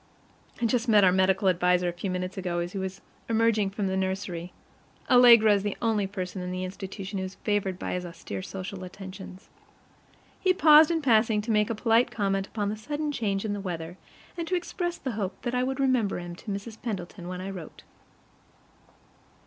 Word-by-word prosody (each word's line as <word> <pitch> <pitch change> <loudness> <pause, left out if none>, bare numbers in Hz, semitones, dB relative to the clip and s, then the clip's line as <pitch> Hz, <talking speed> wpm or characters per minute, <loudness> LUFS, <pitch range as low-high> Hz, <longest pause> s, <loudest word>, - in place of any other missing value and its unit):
I 240 - 0
just 240 +1 +1
met 210 -3 +6
our 185 - +6
medical 190 +1 +2
adviser 180 0 +3
a 175 - -1
few 175 +3 -4
minutes 185 0 -3
ago 180 -2 -3
as 175 0 -2
he 195 - -4
was 190 0 -5 0.3
emerging 225 -3 +2
from 200 +1 -3
the 190 0 -1
nursery 190 -2 -3 0.6
Allegra 235 -4 +8
is 200 - +2
the 205 0 -3
only 215 -4 +1
person 185 -1 -5
in 180 - -4
the 185 0 -3
institution 195 +1 -6
who 190 - -2
is 185 - -8
favored 200 -3 -1
by - - -4
his 180 - -2
austere 165 - -7
social 190 - -6
attentions. 190 0 -10 0.9
He 375 -1 +3
paused 310 -3 +7
in 325 -2 0
passing 225 -4 +4
to 225 +2 -3
make 210 -1 +2
a 230 - -1
polite 230 +2 +3
comment 195 -2 -1
upon 205 -2 -2
the 215 - -3
sudden 295 +6 -3
change 205 -7 -1
in 210 - -1
the 205 - -4
weather, 170 -2 -5 0.4
and 335 -2 -4
to 370 - 0
express 350 0 -3
the 265 - -4
hope 200 -3 -4
that 240 - -2
I 250 - +1
would 265 +1 -2
remember 255 -6 +2
him 175 -1 -7
to 210 - -7
Mrs. 210 +3 -6
Pendleton 185 -5 -5
when 180 0 -5
I 190 +1 -5
wrote. 175 -5 -9
195 Hz, 200 wpm, -27 LUFS, 185-230 Hz, 0.9 s, Allegra